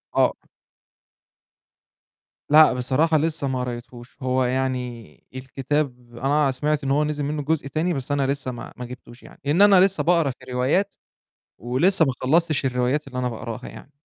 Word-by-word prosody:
آه. - - +3 2.2
لأ، 155 -1 +7
بصراحة 135 +6 +1
لسه 155 -2 -1
ما 130 -1 -2
قريتهوش، 120 0 -7
هو 130 0 +1
يعني 125 -6 -3
الكتاب 130 -2 -3
أنا 140 +2 +2
سمعت 150 +3 -1
إن 135 - -1
هو 145 +2 +3
نزل 150 -1 -2
منه 150 +1 -2
جزء 145 -1 -1
تاني، 160 +5 -1
بس 135 -1 -4
أنا 140 -1 +1
لسه 140 -1 -2
ما 120 - -9
ما 125 - -6
جِبتوش 120 0 -12
يعني - - -15
لإن 150 +7 +2
أنا 205 -2 +7
لسه 195 +1 +3
باقرا 165 -4 +3
في 125 - -14
الروايات 130 +11 0 0.6
ولسه 145 - +2
ما 135 - +1
خلّصتش 155 +2 +2
الروايات 130 +3 0
اللي 125 -1 -5
أنا 125 -1 -1
باقراها 115 -1 -7
يعني. 145 - -13
135 Hz, 160 wpm, -23 LUFS, 125-150 Hz, 2.2 s, لأ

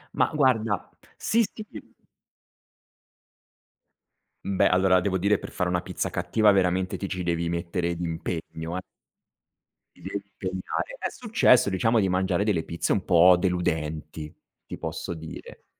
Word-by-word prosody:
Mah, - - +2
guarda 115 -8 +1 0.3
sì, 230 +2 +2
sì. 215 - -9 2.8
Beh, 100 -1 +3
allora, 95 0 +4
devo 95 +1 0
dire, 100 +3 +2
per - - -9
fare 90 -1 -1
una 90 0 0
pizza - - -3
cattiva, 105 +5 +3
veramente, 95 -1 +1
ti 100 - -4
ci 95 -1 -4
devi 85 -1 -1
mettere 85 0 -2
d'impegno, 80 0 -4
eh. - - -3 1.1
Ti - - -20
devi 95 +3 -4 0.2
impegnare. 95 - -4
È - - -3
successo, 215 - +3
diciamo, 115 +5 +2
di 95 -2 +2
mangiare 95 +2 +1
delle 100 -7 +1
pizze 85 +1 -1
un 100 - -1
po' 90 0 +6
deludenti, 80 -4 -2 0.3
ti - - -7
posso - - -4
dire. 80 -1 -10
90 Hz, 135 wpm, -26 LUFS, 85-100 Hz, 2.8 s, po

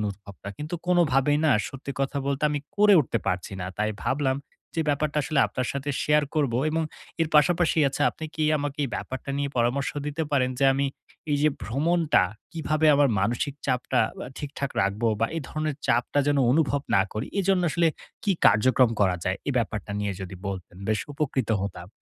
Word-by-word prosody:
অনুভবটা। 100 -1 -6
কিন্তু 150 +3 -4
কোনভাবেই 145 -5 +3
না - - +4 0.2
সত্যি 135 +1 -7
কথা 135 +1 -1
বলতে, 140 0 -1
আমি 145 -1 -1 0.2
করে 205 0 +6
উঠতে 120 -4 -1
পারছি 90 0 -2
না। 90 - -3
তাই 105 +1 +1
ভাবলাম, 135 -1 0 0.4
যে 165 - 0
ব্যাপারটা 150 +1 0
আসলে 145 +1 -1
আপনার 130 -1 -3
সাথে 140 +1 -3
শেয়ার 150 0 +3
করবো। 140 -6 +1
এবং 160 +1 0 0.4
এর 165 - +2
পাশাপাশি 165 +2 +4
আচ্ছা, 135 - -3
আপনি 160 - -8
কি 155 - 0
আমাকে 145 0 -4
এই - - -3
ব্যাপারটা 130 +1 -6
নিয়ে 140 0 -1
পরামর্শ 120 +3 +1 0.2
দিতে 150 +2 -2
পারেন? 130 -3 +2
যে 135 - +2
আমি, 140 +1 +1 0.4
এই 145 - +3
যে 155 - +5
ভ্রমণটা 155 - +2 0.3
কিভাবে 155 -1 0
আমার 140 0 +4
মানসিক 120 +7 -1
চাপটা 125 -1 +1 0.2
আ - - -7
ঠিকঠাক 140 -1 -4
রাখবো? 100 +4 0
বা 115 - +3
এই 165 - -2
ধরণের 155 -2 -2
চাপটা 120 +4 +1
যেন 145 -1 +3
অনুভব 145 -1 +2
না 95 - +5
করি। 110 - -3
এজন্য 190 -1 +2
আসলে 170 +2 +2 0.4
কি 205 - +3
কার্যক্রম 125 +3 +4
করা 95 -3 +3
যায়? 95 +1 0
এই - - +1
ব্যাপারটা 110 -3 -3
নিয়ে 105 -1 -1
যদি 95 0 -6
বলতেন, 95 -2 -7
বেশ 110 -2 +1
উপকৃত 135 -5 -1
হতাম। 95 -3 -6
140 Hz, 185 wpm, -26 LUFS, 115-150 Hz, 0.4 s, করে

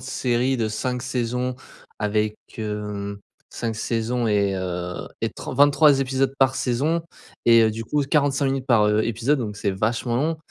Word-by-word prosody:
série 130 0 0
de 115 -3 0
5 125 +3 -3
saisons 125 0 -2 0.4
avec 105 0 0 0.2
hem, 105 -2 -4 0.3
5 115 -2 -3
saisons 115 +1 -1
et 100 -2 +2
heu 90 -1 -3 0.3
et - - 0
tr - - -7
23 145 +1 +5
épisodes 135 0 0
par 130 -1 +4
saison 135 +7 0 0.4
et 115 -1 +7
heu, 110 - +3
du 115 +1 -5
coup 145 +6 0
45 140 -1 +2
minutes 135 -1 -1
par 115 -5 +4
heu, 105 +1 +2
épisode 120 +6 +1
donc 105 -3 -4
c'est 100 -2 -1
vachement 115 +5 -1
long. 155 +5 0
120 Hz, 165 wpm, -23 LUFS, 105-130 Hz, 0.4 s, et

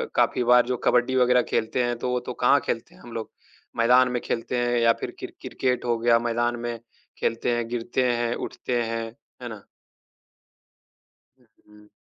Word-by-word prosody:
काफ़ी - - +2
बार 125 0 +5
जो 125 0 -1
कबड्डी 125 +1 +2
वग़ैरह 125 0 +4
खेलते 115 +3 0
हैं, 120 0 -1
तो 125 +2 -3
वो 125 - +1
तो 125 +1 -6
कहाँ 140 +3 +6
खेलते 115 - -3
हैं - - -18
हम 120 - -12
लोग, 115 -1 -5 0.5
मैदान 125 +2 +5
में 125 -1 -1
खेलते 120 +2 -2
हैं 120 0 +1
या 115 0 +5
फिर - - -3
क्रि - - -5
क्रिकेट 125 -1 -1
हो 120 -1 +1
गया, 115 0 +4
मैदान 120 0 0
में 120 -1 -4 0.4
खेलते 115 +1 0
हैं, 120 -1 -2
गिरते 120 +2 -1
हैं, 120 0 0
उठते 120 -1 -3
हैं। 115 0 -3 0.4
है - - -5
ना? - - -9 1.8
उ, - - -27 0.2
हुँ। 105 0 -19
120 Hz, 185 wpm, -25 LUFS, 115-125 Hz, 1.8 s, कहाँ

